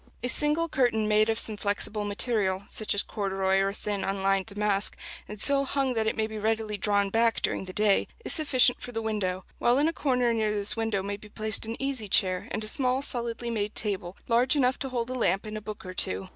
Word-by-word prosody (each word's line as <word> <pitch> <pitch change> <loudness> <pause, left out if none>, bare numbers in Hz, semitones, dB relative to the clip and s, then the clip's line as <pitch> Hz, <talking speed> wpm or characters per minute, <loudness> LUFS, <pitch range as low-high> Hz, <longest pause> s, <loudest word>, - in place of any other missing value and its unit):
A 250 - 0
single 300 +6 +4
curtain 240 -8 +1
made 215 +1 +3
of 225 - 0
some 215 -2 0
flexible 205 +1 0
material, 205 -2 0
such 215 -2 -1
as 200 - +4
corduroy 195 -2 -1
or 195 0 +1
thin 205 0 -4
unlined 195 0 0
damask, 205 -1 0 0.3
and 210 0 -6
so 280 +4 +5
hung 275 -1 -1
that 220 -2 -1
it - - 0
may 220 - 0
be 220 0 -6
readily 220 0 -1
drawn 200 0 0
back 225 +1 +2
during - - -1
the 185 - -8
day, 210 +1 +2 0.2
is - - +4
sufficient 265 -5 +4
for 245 - -7
the 225 -1 -4
window; 190 -4 -2
while 240 +1 +3
in 295 +3 +3
a 330 - -1
corner 250 -6 +1
near 220 -2 0
this 205 -1 0
window 225 -4 -1
may 200 0 -4
be 210 +1 -14
placed 215 +1 -1
an 225 - -5
easy 270 -5 -1
chair 185 -1 +2
and 215 - -2
a - - -4
small 255 +2 0
solidly 235 -2 -2
made 210 -2 -3
table, 195 -4 -3
large 245 +4 +3
enough 260 -2 +1
to 270 - -4
hold 245 -1 -3
a - - -2
lamp 200 -5 0
and 215 0 -6
a 215 - -5
book 210 -1 -8
or 185 - -7
two. 95 - 0
215 Hz, 230 wpm, -27 LUFS, 200-240 Hz, 0.3 s, so